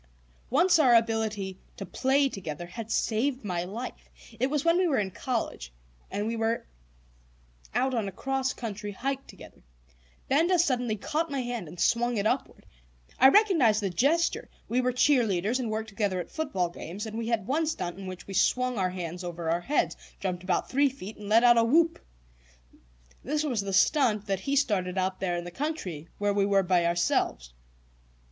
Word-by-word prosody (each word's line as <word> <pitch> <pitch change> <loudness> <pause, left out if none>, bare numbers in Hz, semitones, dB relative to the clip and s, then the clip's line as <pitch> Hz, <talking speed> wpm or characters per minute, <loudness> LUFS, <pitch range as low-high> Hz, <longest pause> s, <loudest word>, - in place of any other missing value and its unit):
Once 340 +6 +4
our 255 -6 +6
ability 220 -4 0 0.2
to 195 - -5
"play 270 +8 +2
together" 175 - -6
had 220 +5 -8
saved 245 +3 0
my 175 -3 -1
life. 220 +8 -7 0.3
It 255 - +2
was 300 +1 -1
when 335 +1 +4
we 370 - +3
were 290 - +1
in 195 -2 -1
college 220 - -3 0.4
and 205 +1 -2
were 225 +1 0 1.1
out 260 +1 +1
on 225 -4 -1
a - - -4
cross 265 +5 -1
country 210 -3 -6
hike 270 +6 -3
together; - - -14 0.7
Benda 330 +7 +3
suddenly 250 -9 +1
caught 310 +10 -2
my 275 -2 -2
hand 240 -7 -4
and 170 +3 -11
swung 235 +2 +2
it 200 - -1
upward. - - -2 0.5
I 265 - +9
recognized 320 - +4
the 195 - -1
gesture; 295 - +1 0.2
we 250 +2 +1
were 250 0 +1
cheerleaders 240 -4 +2
and 240 -3 -2
worked 220 0 -3
together 200 -3 -1
at 175 - -6
football 275 - -1
games, 180 +4 -7
and 220 0 -7
we 225 0 -3
had 230 -4 0
one 310 +7 0
stunt 180 - -3
in 195 - -7
which 185 -1 -8
we 195 - -8
swung 250 +5 +1
our 185 -1 +1
hands 180 -1 -5
over 170 -2 -3
our 170 +1 0
heads, 290 +11 0 0.2
jumped 180 -2 -3
about 180 -1 -1
three 280 +2 +3
feet, 220 -5 -9
and 205 -1 -8
let 225 +2 +5
out 240 -1 +7
a - - +4
whoop. 325 +8 +2 1.2
This 300 +3 -1
was 250 -8 0
the 200 0 -4
"stunt" 215 -1 +3
that 195 -2 -1
he 275 +8 -1
started 195 -9 +1
out 185 0 -1
there 175 -2 -1
in 175 - -4
the 175 - -8
country, 190 - -4
where 205 0 +1
we 200 -1 +2
were 195 -1 +3
by 175 -2 +2
ourselves. - - 0
220 Hz, 185 wpm, -28 LUFS, 190-265 Hz, 1.2 s, I